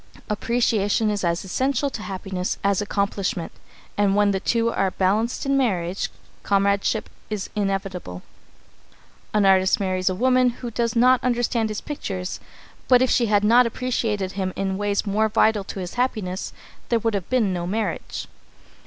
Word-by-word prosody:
Appreciation 220 -1 +1
is 205 -2 -2
as 170 +1 0
essential 270 +7 0
to 220 - -6
happiness 190 -2 -4
as 200 0 +2
accomplishment, 200 -3 -2 0.4
and 200 -1 +2
when 205 0 +4
the 190 - 0
two 230 +3 +1
are 195 - +1
balanced 210 +8 0
in 275 0 +2
marriage, 190 -8 0 0.3
comradeship 200 +2 +1 0.2
is 210 -3 -4
inevitable. 195 - -3 1.1
An 210 -1 +2
artist 190 0 +4
may 200 - -1
marry 185 -1 -1
a 185 - -2
woman 255 +3 +3
who 240 0 -6
does 230 0 -1
not 250 +2 +4
understand 240 -2 +1
his 215 - -4
pictures, 190 -11 -5 0.5
but 250 -1 +6
if 255 - +1
she 235 - +3
had 205 -1 +3
not 235 +3 +5
appreciated 225 -5 -2
him 190 -2 -3
in 195 -1 -1
ways 205 0 0
more 215 +2 +1
vital 215 -1 +3
to 195 - -6
his 180 -1 -5
happiness, 215 -7 -2 0.4
there 235 - +3
would 225 0 -1
have 195 -4 -3
been 230 -7 +2
no 175 -1 -3
marriage. 200 -2 -3
205 Hz, 160 wpm, -23 LUFS, 190-235 Hz, 1.1 s, but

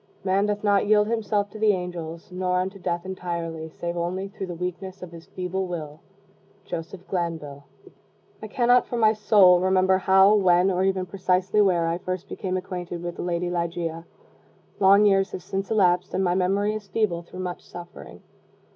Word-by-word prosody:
Man 195 +2 +1
doth 210 0 -2
not 205 -1 +2
yield 210 0 +4
himself 210 -3 -1
to 215 - -9
the 215 -1 +4
angels, 175 -2 -6
nor 180 0 -1
unto 190 +2 -3
death 175 -1 -3
utterly, 170 -3 -5
save 170 +2 -5
only 180 +3 -3
through 195 -1 -6
the 175 - -6
weakness 180 +2 -6
of 175 - -9
his 170 -1 -12
feeble 185 +1 -3
will. 155 -4 -6 0.7
Joseph 175 +3 -7
Glanvill. 160 -6 -4 0.8
I 215 - -6
cannot, 245 +3 +3
for 240 - -3
my 220 -1 +4
soul, 205 -4 +5
remember 185 0 +3
how, 190 +2 +5
when, 185 -2 +4
or 185 0 0
even 190 -1 0
precisely 185 +2 +1
where, 180 -4 +2
I 165 +1 -1
first 185 0 -5
became 185 -2 -3
acquainted 180 -2 -6
with 175 0 -5
the - - -4
lady 175 0 -2
Ligeia. 170 -1 -3 0.7
Long 200 +2 +6
years 195 -1 +2
have 180 - -6
since 195 +1 -4
elapsed, 185 -4 +2
and 190 - +1
my 175 -1 +2
memory 195 +3 +1
is 215 -2 -6
feeble 190 -4 -1
through 185 +2 -9
much 180 -1 -5
suffering. 175 0 -11
185 Hz, 180 wpm, -24 LUFS, 175-195 Hz, 0.8 s, Long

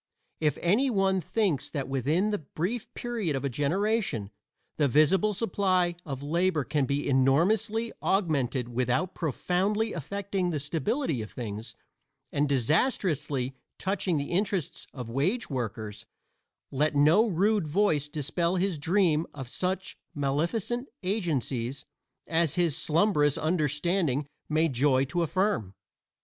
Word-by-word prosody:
If 150 -2 +1
any 215 +11 +3
one 195 -4 +2
thinks 160 - 0
that 140 -4 -3
within 150 - +1
the 205 - -1
brief 180 - -4
period 225 - -2
of 135 - -2
a - - +1
generation 150 - 0 0.5
the 145 - +3
visible 155 - +4
supply 185 -4 +1
of 135 -1 -5
labor 165 +1 +1
can 145 0 0
be 140 +2 -1
enormously 195 - +2
augmented 140 - +1
without 125 +9 0
profoundly 190 - 0
affecting 190 +3 -2
the 155 -4 -1
stability 165 - -1
of 110 - -6
things 110 -2 -6 0.6
and 145 0 +1
disastrously 145 - +1 0.2
touching 190 -3 0
the 140 0 -3
interests 190 -2 -1
of 125 -4 -7
wage 155 - -1
workers 110 -5 -4 0.6
let 150 +2 +1
no 160 +11 +5
rude 200 -1 +2
voice 155 -3 +2
dispel 165 +4 -1
his 185 -3 0
dream 165 -1 +2
of 135 -3 -6
such 185 +7 -3 0.2
maleficent 170 - -1
agencies 140 - -1 0.4
as 165 -2 +1
his 170 -5 +2
slumbrous 150 -3 +2
understanding 155 -2 +1 0.2
may 155 +2 +3
joy 135 -1 +2
to 155 +6 -1
affirm. 170 - 0
160 Hz, 125 wpm, -28 LUFS, 140-195 Hz, 0.6 s, no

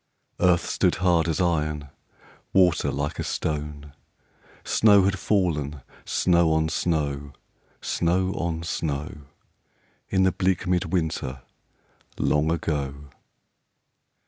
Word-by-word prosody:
Earth 90 -2 +3
stood - - +1
hard 85 -3 +2
as 80 - -1
iron,. 75 -5 0 0.6
Water 90 -4 +4
like 70 +1 -3
a - - -1
stone; 75 -2 -4 0.7
Snow 100 -3 +5
had 100 0 0
fallen, 75 -9 0 0.2
snow 85 -2 +3
on 80 0 +1
snow. 75 -4 -1 0.5
Snow 95 +3 0
on 85 -1 -3
snow, 75 -3 -4 0.8
In 95 -1 +2
the 95 - +4
bleak 95 -1 0
mid 90 0 +1
winter 70 -7 -2 0.7
Long 75 +1 +1
ago. 70 -4 -3
80 Hz, 105 wpm, -25 LUFS, 75-90 Hz, 0.8 s, Snow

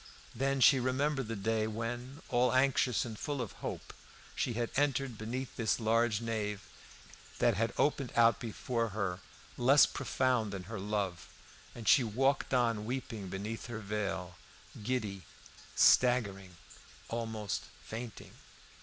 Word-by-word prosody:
Then 135 +2 0
she 135 +2 +7
remembered 135 +1 0
the 115 - -3
day 110 +2 0
when, 120 +6 -5
all 125 +1 +3
anxious 130 -2 +3
and 110 -3 -7
full 145 -2 -3
of 120 -6 -3
hope, - - -5 0.4
she 125 - -1
had 120 0 -2
entered 135 -3 +1
beneath 120 +5 -5
this 115 +1 0
large 115 0 +2
nave, 105 -3 -2 0.8
that 120 -1 +3
had 115 +3 0
opened 140 -4 +1
out 115 0 +5
before 115 0 -2
her, 90 -3 -1 0.4
less 135 +4 +7
profound 125 -6 0
than 95 -2 -5
her 110 +3 -6
love; 100 -3 -2 0.5
and 115 -2 -8
she 130 - +7
walked 135 +5 +1
on 115 -4 +1
weeping 115 -5 -4
beneath 105 +5 -5
her 120 -2 -5
veil, 100 -4 -3 0.4
giddy, 105 -5 -2 0.5
staggering, 100 -7 +4 0.5
almost 110 -3 -3 0.2
fainting. 115 0 -7
115 Hz, 135 wpm, -32 LUFS, 105-125 Hz, 0.8 s, she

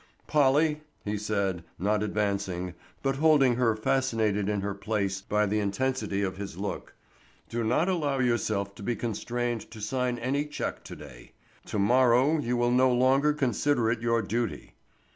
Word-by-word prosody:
"Polly," 150 +2 +3 0.2
he 105 +1 -1
said, 100 -4 -1
not 105 +3 +1
advancing, 100 -4 -2 0.3
but 135 -1 0
holding 140 -5 +4
her 115 -3 +2
fascinated 110 -4 0
in 105 -1 0
her 100 0 -2
place 100 -1 -2
by 105 +2 +1
the 105 +1 0
intensity 105 0 -1
of 95 -1 -3
his 100 -4 -6
look, 100 +1 -5 0.5
"do 115 0 -2
not 125 +10 +2
allow 150 -7 0
yourself 110 -5 0
to - - -13
be 120 +4 -1
constrained 120 +1 -3
to 110 - -11
sign 125 +3 -1
any 135 +5 -1
check 150 - -4
to - - -8
day. 65 -5 -13 0.3
To - - -3
morrow 125 +7 +4
you 125 -3 -1
will 120 0 +2
no 130 +1 +4
longer 130 +4 +3
consider 130 -3 +1
it 115 -1 -2
your 115 -1 +1
duty." 115 +5 -3
115 Hz, 160 wpm, -28 LUFS, 100-130 Hz, 0.5 s, holding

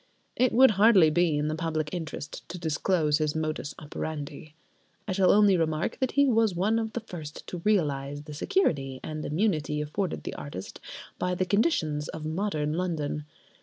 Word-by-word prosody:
It 255 0 +3
would 260 +1 +7
hardly 195 -8 +7
be 170 -2 +2
in 150 +1 0
the 155 - -1
public 155 -1 -2
interest 160 -3 -6
to 175 - -6
disclose 160 -1 +1
his 155 -1 0
modus 155 -2 -3
operandi. 150 0 -6 0.5
I - - -2
shall 185 -1 +3
only 205 -2 +6
remark 160 -1 -1
that 260 -2 0
he 280 0 +5
was 225 -7 +3
one 210 +6 +2
of 220 0 -3
the 240 - -3
first 160 -8 -8
to 180 - -6
realise 145 -8 0
the 150 0 -9
security 145 - 0
and 155 -1 -5
immunity 155 -3 0
afforded 160 +5 -3
the - - -5
artist 120 -10 -7 0.4
by 180 0 0
the 185 - 0
conditions 170 - +1
of 155 -1 -6
modern 155 -3 -1
London. 155 -4 -2
160 Hz, 170 wpm, -27 LUFS, 150-195 Hz, 0.5 s, would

